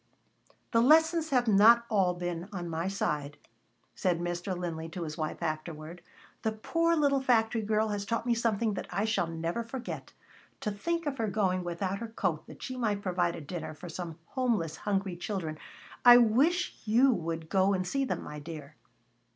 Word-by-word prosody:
"The 230 - +4
lessons 320 +4 +4
have 250 -4 +2
not 225 +3 +6
all 190 -5 +2
been 175 +1 -4
on 180 -4 -5
my 165 +2 -2
side," 150 -7 -2 0.6
said 180 -3 0
Mr. 175 +2 -3
Linley 165 -2 -4
to 170 +1 -5
his 155 -2 -5
wife 155 +2 -4
afterward. 155 +1 -4 0.4
"The 220 - 0
poor 330 +10 +1
little 280 -3 +2
factory 225 -3 +2
girl 215 +1 +1
has 205 -1 -2
taught 230 +2 -2
me 240 - +3
something 225 -2 +1
that - - -5
I 200 +4 -1
shall 215 -6 +1
never 165 +6 -3
forget. 240 +2 -6 0.5
To 210 - -1
think 335 +11 -2
of 275 -2 -3
her 225 - +1
going 190 -3 0
without 185 +3 -2
her 230 - -5
coat 225 - -2
that - - -11
she 255 -1 -5
might 210 -4 -1
provide 175 -2 0
a - - -7
dinner 155 +1 -6
for 175 +3 -9
some 165 -1 -6
homeless, 225 - 0
hungry 195 -3 -1
children. 175 -4 -4 0.4
I 245 0 +10
wish 270 +10 +2
you 240 +5 +5
would 165 -3 -4
go 190 +3 +3
and 185 -1 -1
see 275 +7 0
them, 265 - -2
my 150 0 -7
dear." 150 -1 -9
200 Hz, 185 wpm, -30 LUFS, 170-235 Hz, 0.6 s, I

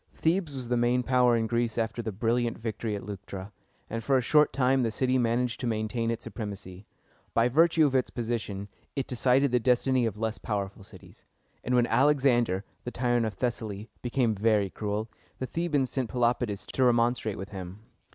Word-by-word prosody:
Thebes 165 -3 0
was 125 -3 -6
the 125 - +2
main 120 +1 +2
power 125 -2 +4
in 115 - 0
Greece 115 0 -1
after 115 +1 -1
the 110 - -4
brilliant 115 +3 0
victory 110 -1 -3
at 100 - -6
Leuctra, 100 0 -7 0.4
and 115 0 -4
for 135 +2 +3
a - - +2
short 150 +3 +4
time 130 0 +2
the 115 - +1
city 130 +3 +1
managed 120 0 0
to 125 - -2
maintain 115 +1 -1
its 115 -1 -3
supremacy. 100 -3 -7 0.5
By 115 +1 +4
virtue 160 +3 +4
of 140 - +1
its 130 -2 +2
position, 110 -4 -3 0.3
it 135 -2 -1
decided 130 +2 +2
the 125 - +3
destiny 125 0 +2
of 105 -2 -4
less 110 0 -2
powerful 100 -2 -4
cities; - - -16 0.4
and 125 - 0
when 120 -1 +4
Al 135 +4 +4
ex 145 -3 +1
an´der, 120 -8 +2 0.3
tyrant 120 -2 +1
of 105 - -5
Thessaly, 110 -2 -3
became 120 -2 +1
very 105 -2 +2
cruel, 105 +1 -3 0.3
the 130 - -3
Thebans 150 -3 -1
sent 130 -4 -2
Pelopidas 120 -5 0
to 130 - +1
remonstrate 120 -3 +2
with 95 +1 -6
him. 95 -1 -7
120 Hz, 190 wpm, -28 LUFS, 110-125 Hz, 0.5 s, power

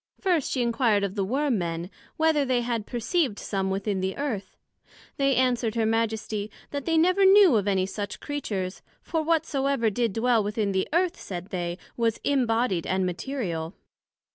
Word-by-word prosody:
First, 355 -7 +1
she 255 - +1
enquired 230 -3 +2
of 195 -2 -1
the 200 -2 -1
Worm 260 +2 0
men, 170 +1 -3 0.3
whether 315 -2 +3
they 255 -2 +1
had 235 -3 -2
perceived 245 - 0
some 195 -2 -2
within 195 0 -1
the 190 0 -2
Earth? 225 -10 -4 0.6
They 275 -2 +2
answered 245 -3 +1
her 225 -1 +1
Majesty, 220 -2 -1 0.2
That 285 -2 -4
they 325 -1 +2
never 365 +4 +4
knew 385 - +7
of 205 -2 +1
any 190 -2 +2
such 205 +1 -5
Creatures; 200 -10 -4 0.2
for 325 -2 -1
whatsoever 280 -7 +1
did 230 0 0
dwell 230 0 +2
within 205 0 -1
the 190 -1 0
Earth, 345 +2 +1
said 180 -1 -7
they, 175 -2 -3 0.2
was 230 -2 +1
imbodied 235 -9 +1
and 190 0 +1
material. 180 - -3
230 Hz, 165 wpm, -26 LUFS, 195-275 Hz, 0.6 s, knew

